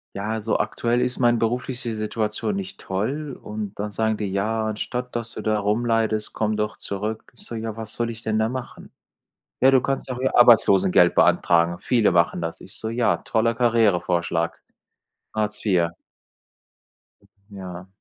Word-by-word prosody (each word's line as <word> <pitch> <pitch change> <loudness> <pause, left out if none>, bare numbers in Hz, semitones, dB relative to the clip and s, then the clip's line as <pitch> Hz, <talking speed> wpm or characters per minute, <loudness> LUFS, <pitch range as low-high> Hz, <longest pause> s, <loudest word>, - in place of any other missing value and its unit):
Ja, 100 +2 -3
also 110 0 0
aktuell 120 +1 0
ist 125 0 -1
meine 120 -1 +4
berufliche 120 +1 -2
Situation 110 - -2
nicht 195 -1 -6
toll. 130 +9 -3
Und 105 -1 -6
dann 105 0 -3
sagen 110 0 0
die: 105 - -3
„Ja, 110 +3 0
anstatt 125 +3 -4
dass 115 0 -4
du - - -6
da 110 -1 +1
rumleidest, 110 0 0
komm 110 -1 0
doch 105 0 -2
zurück.“ 105 +2 -4
Ich - - -9
so: 115 - -6
„Ja, 110 -1 -4
was 110 -1 -7
soll 120 0 -1
ich 115 0 -8
denn 110 0 0
da 110 - +2
machen?“ 130 -1 -7 0.7
„Ja, 130 - +6
du 130 -1 +5
kannst 135 0 -2
doch 125 - -3
hier 130 +1 0
Arbeitslosengeld 95 -7 +6
beantragen. 85 0 +3
Viele 115 -7 +2
machen 85 0 +2
das.“ 80 0 -4
Ich 105 - -9
so: 110 - -3
„Ja, 120 0 +2
toller 115 0 0
Karrierevorschlag, 90 -8 +1 0.7
Hartz 105 0 -2
IV.“ 90 -5 +3 1.6
Ja. 90 -2 -8
110 Hz, 165 wpm, -23 LUFS, 100-120 Hz, 1.6 s, Ja